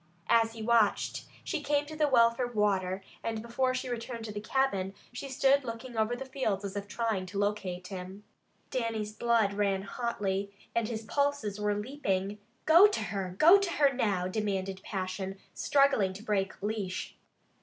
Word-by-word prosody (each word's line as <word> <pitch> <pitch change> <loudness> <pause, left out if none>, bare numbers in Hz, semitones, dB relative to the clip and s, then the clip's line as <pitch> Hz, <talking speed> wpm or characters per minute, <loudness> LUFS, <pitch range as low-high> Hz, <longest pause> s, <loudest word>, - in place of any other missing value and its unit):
As 225 -1 +4
he 225 -1 -7
watched 225 -3 +2 0.2
she 330 -5 -2
came 290 0 +1
to 310 +1 -8
the 305 -1 +2
well 235 -4 +5
for 245 +1 -2
water 195 -4 0 0.2
and 225 -1 -2
before 255 +3 0
she 255 0 -3
returned 235 -1 -4
to 215 - -5
the 205 0 -5
cabin 200 -6 0 0.2
she 275 +3 -6
stood 275 +1 +3
looking 235 +1 -6
over 220 +2 +1
the 270 +2 -6
fields 235 -7 -2
as 200 0 -5
if 200 0 -4
trying 210 -2 -1
to 195 +2 -6
locate 190 -3 -2
him. 190 +1 -7 0.5
Dannie's 225 -4 -2
blood 225 -2 +2
ran 200 -1 0
hotly 200 -3 -2 0.2
and 235 -2 +1
his 225 -1 -4
pulses 235 -4 -1
were 210 0 +1
leaping. 205 -4 -2 0.3
"Go 340 +6 +8
to 415 - -2
her! 185 -2 -3
Go 345 - +8
to 390 -3 -1
her 280 -2 +4
now!" 200 -8 0
demanded 195 -1 -2
passion, 190 0 -4 0.2
struggling 275 -9 +3
to 200 +3 -10
break 195 -3 -1
leash. 205 -3 -3
215 Hz, 175 wpm, -30 LUFS, 195-255 Hz, 0.5 s, Go